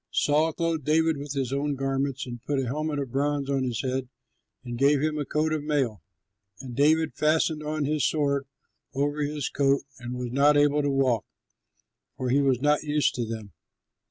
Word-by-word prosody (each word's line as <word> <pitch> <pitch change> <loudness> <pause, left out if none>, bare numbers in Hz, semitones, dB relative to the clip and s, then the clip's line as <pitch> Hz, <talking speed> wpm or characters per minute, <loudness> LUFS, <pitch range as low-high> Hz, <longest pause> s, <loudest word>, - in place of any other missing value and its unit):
Saul 155 +2 +2
clothed 165 -2 -1
David 160 +2 +2
with 140 0 -5
his 135 -2 -2
own 145 +1 -1
garments, 135 0 -1
and 120 -2 -8
put 145 - -1
a 135 - -1
helmet 150 +4 -2
of 135 -4 -3
bronze 140 +1 0
on 135 -1 +1
his 125 -1 -2
head 130 -1 -2 0.5
and 120 -2 -5
gave 140 +3 +3
him 155 +1 -1
a 145 - -2
coat 155 +3 0
of 155 -2 -2
mail. 135 -9 0 0.6
And 130 -3 -8
David 155 +3 +3
fastened 155 0 +1
on 150 -1 -2
his 150 0 0
sword 140 -2 +1 0.5
over 145 +2 0
his 145 -1 -2
coat 140 0 +1 0.2
and 120 +1 -6
was 125 -1 -4
not 145 +3 +4
able 145 0 +4
to 145 - 0
walk, 130 -5 +1 0.9
for 125 -1 -1
he 140 +2 +4
was 135 -3 +2
not 150 +2 +2
used 150 -1 +1
to 120 -2 -3
them. 110 -4 -7
140 Hz, 190 wpm, -26 LUFS, 130-150 Hz, 0.9 s, not